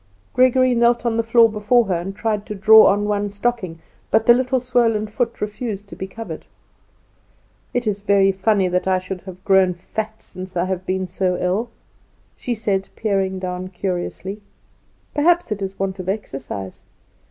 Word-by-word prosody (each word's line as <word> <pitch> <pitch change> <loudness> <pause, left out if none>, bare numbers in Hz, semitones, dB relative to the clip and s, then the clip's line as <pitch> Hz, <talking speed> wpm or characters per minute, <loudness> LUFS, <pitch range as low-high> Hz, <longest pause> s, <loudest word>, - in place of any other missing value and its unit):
Gregory 255 0 +4
knelt 240 0 +2
on 235 -1 +1
the 230 - +2
floor 230 0 +5
before 225 +3 +2
her, 190 - -1
and 180 +3 -3
tried 215 -2 -1
to 210 - -6
draw 220 +2 +7
on 205 +1 +2
one 205 0 -1
stocking, 200 -4 -2 0.3
but 220 - +2
the 240 - +8
little 255 +1 +1
swollen 235 -3 +1
foot 230 +2 -3
refused 210 -1 -4
to - - -10
be 190 - -5
covered. 225 +4 -8 1.2
"It 245 0 -1
is 205 -2 -1
very 200 -1 +3
funny 195 0 +1
that 180 +1 -1
I 190 -1 +3
should 185 0 -6
have 185 0 -12
grown 190 -2 +4
so - - -25
fat 220 +2 -5
since 185 0 -8
I 175 - +1
have 185 -1 -4
been 185 0 -1
so 180 0 -1
ill," 200 +7 -1 0.7
she 245 - -3
said, 200 -4 -1
peering 195 -3 -1
down 185 0 -4
curiously. 190 +2 -4 0.7
"Perhaps 345 0 +2
it 210 -1 -2
is 195 0 -4
want 195 0 -3
of 185 0 -4
exercise." 135 - -5
205 Hz, 175 wpm, -21 LUFS, 185-230 Hz, 1.2 s, the